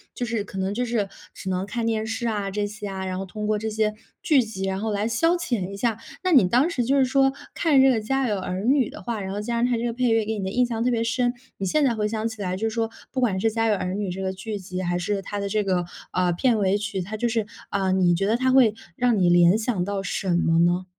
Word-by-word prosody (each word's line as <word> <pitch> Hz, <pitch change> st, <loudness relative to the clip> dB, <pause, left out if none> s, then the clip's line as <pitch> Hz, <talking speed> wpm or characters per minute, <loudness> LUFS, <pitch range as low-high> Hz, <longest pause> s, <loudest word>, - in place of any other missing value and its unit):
就 245 Hz, -, -2 dB
是 225 Hz, -3 st, -2 dB
可 195 Hz, -, -9 dB
能 190 Hz, +1 st, -1 dB
就 245 Hz, +3 st, -1 dB
是， 225 Hz, -4 st, -1 dB, 0.2 s
只 190 Hz, -, -6 dB
能 185 Hz, +1 st, -1 dB
看 235 Hz, +3 st, -3 dB
电 220 Hz, -1 st, 0 dB
视 225 Hz, +2 st, -2 dB
啊， 205 Hz, -3 st, -2 dB
这 205 Hz, +1 st, -1 dB
些 210 Hz, 0 st, -7 dB
啊。 190 Hz, 0 st, -4 dB
然 185 Hz, 0 st, -3 dB
后 195 Hz, -, -4 dB
通 210 Hz, +3 st, -5 dB
过 215 Hz, 0 st, +2 dB
这 220 Hz, -, -3 dB
些 215 Hz, 0 st, 0 dB, 0.3 s
剧 305 Hz, -6 st, +4 dB
集 215 Hz, -4 st, -5 dB
然 190 Hz, 0 st, -1 dB
后 220 Hz, 0 st, -1 dB
来 205 Hz, +1 st, 0 dB
消 330 Hz, +10 st, +2 dB
遣 240 Hz, -, -2 dB
一 -, -, -6 dB
下。 225 Hz, 0 st, 0 dB, 0.3 s
那 370 Hz, -, +1 dB
你 260 Hz, -, +6 dB
当 250 Hz, -, +3 dB
时 260 Hz, -8 st, -1 dB
就 275 Hz, -, +2 dB
是 270 Hz, -, +5 dB
说 270 Hz, +1 st, +3 dB, 0.2 s
看 295 Hz, -5 st, +4 dB
这 270 Hz, -, +6 dB
个 250 Hz, -, +3 dB
《家 270 Hz, +2 st, +1 dB
有 210 Hz, -3 st, 0 dB
儿 185 Hz, +1 st, -3 dB
女》 265 Hz, -1 st, +3 dB
的 -, -, -10 dB
话， 235 Hz, -3 st, -3 dB
然 190 Hz, 0 st, -4 dB
后 205 Hz, -, -3 dB
加 235 Hz, +3 st, -2 dB
上 -, -, +5 dB
它 -, -, +3 dB
这 230 Hz, -, -3 dB
个 235 Hz, -, 0 dB
配 250 Hz, +1 st, +1 dB
乐 225 Hz, -1 st, +3 dB
给 220 Hz, 0 st, -2 dB
你 200 Hz, -, -3 dB
的 190 Hz, -, -2 dB
印 250 Hz, +4 st, +2 dB
象 230 Hz, -1 st, -2 dB
特 250 Hz, -, +2 dB
别 230 Hz, -1 st, +1 dB
深， 245 Hz, +1 st, +1 dB, 0.2 s
你 195 Hz, -, -3 dB
现 295 Hz, +11 st, +2 dB
在 240 Hz, -, +2 dB
回 210 Hz, -1 st, 0 dB
想 220 Hz, +1 st, -2 dB
起 220 Hz, -2 st, -7 dB
来 185 Hz, -1 st, -1 dB
就 225 Hz, +3 st, 0 dB
是 -, -, -8 dB
说， 225 Hz, -1 st, 0 dB, 0.2 s
不 260 Hz, -, -2 dB
管 205 Hz, -7 st, +1 dB
是 225 Hz, +3 st, +2 dB
《家 225 Hz, 0 st, +1 dB
有 215 Hz, -, +3 dB
儿 185 Hz, -1 st, -3 dB
女》 205 Hz, -1 st, -2 dB
这 190 Hz, -, -5 dB
个 190 Hz, 0 st, -1 dB
剧 205 Hz, +2 st, -5 dB
集， 185 Hz, -1 st, -6 dB
还 175 Hz, 0 st, 0 dB
是 195 Hz, +3 st, -1 dB
它 205 Hz, +2 st, -4 dB
的 200 Hz, 0 st, -2 dB
这 210 Hz, +1 st, +1 dB
个， 185 Hz, -2 st, +1 dB, 0.3 s
嗯， 180 Hz, -1 st, +1 dB
片 240 Hz, +4 st, +2 dB
尾 195 Hz, 0 st, +2 dB
曲， 205 Hz, -2 st, -3 dB
它 210 Hz, +5 st, -5 dB
就 240 Hz, -, 0 dB
是 225 Hz, -2 st, 0 dB, 0.3 s
嗯， 190 Hz, -1 st, +1 dB
你 175 Hz, -2 st, +4 dB
觉 195 Hz, +4 st, 0 dB
得 225 Hz, -, +2 dB
它 260 Hz, +1 st, +2 dB
会 255 Hz, -5 st, +5 dB, 0.2 s
让 245 Hz, -2 st, +2 dB
你 180 Hz, -, +3 dB
联 175 Hz, +2 st, +6 dB
想 215 Hz, -5 st, -1 dB
到 200 Hz, 0 st, -3 dB
什 190 Hz, 0 st, -3 dB
么 165 Hz, -1 st, +2 dB
呢？ 175 Hz, +2 st, +2 dB
215 Hz, 315 characters per minute, -24 LUFS, 190-235 Hz, 0.3 s, 你